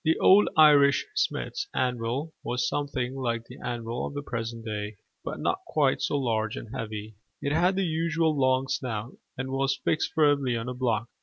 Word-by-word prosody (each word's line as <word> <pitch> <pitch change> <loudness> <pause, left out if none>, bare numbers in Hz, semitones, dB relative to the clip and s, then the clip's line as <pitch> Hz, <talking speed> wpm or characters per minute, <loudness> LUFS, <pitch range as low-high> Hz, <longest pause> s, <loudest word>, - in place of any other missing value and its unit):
The 160 -1 +3
old 200 +2 +6
Irish 145 -3 +6
smith's - - -1
anvil 125 +5 -1
was 120 0 -1
something 135 -3 -2
like 120 -3 -2
the 125 +4 -12
anvil 120 -1 -3
of - - -9
the 145 - -3
present 115 -2 -5
day, 105 -1 -4 0.3
but - - -5
not - - 0
quite - - +2
so 145 - 0
large 110 -5 -1
and 115 +3 -8
heavy: 110 -1 -5 0.3
it 140 0 -2
had 180 +4 +3
the 195 0 +1
usual 165 -1 +1
long 130 -1 +2
snout, 115 -2 -3 0.2
and 130 0 -4
was 135 0 +1
fixed 155 - 0
firmly 145 -5 +3
on 115 +1 -4
a 125 - -3
block. 120 -3 0
130 Hz, 180 wpm, -27 LUFS, 115-145 Hz, 0.3 s, old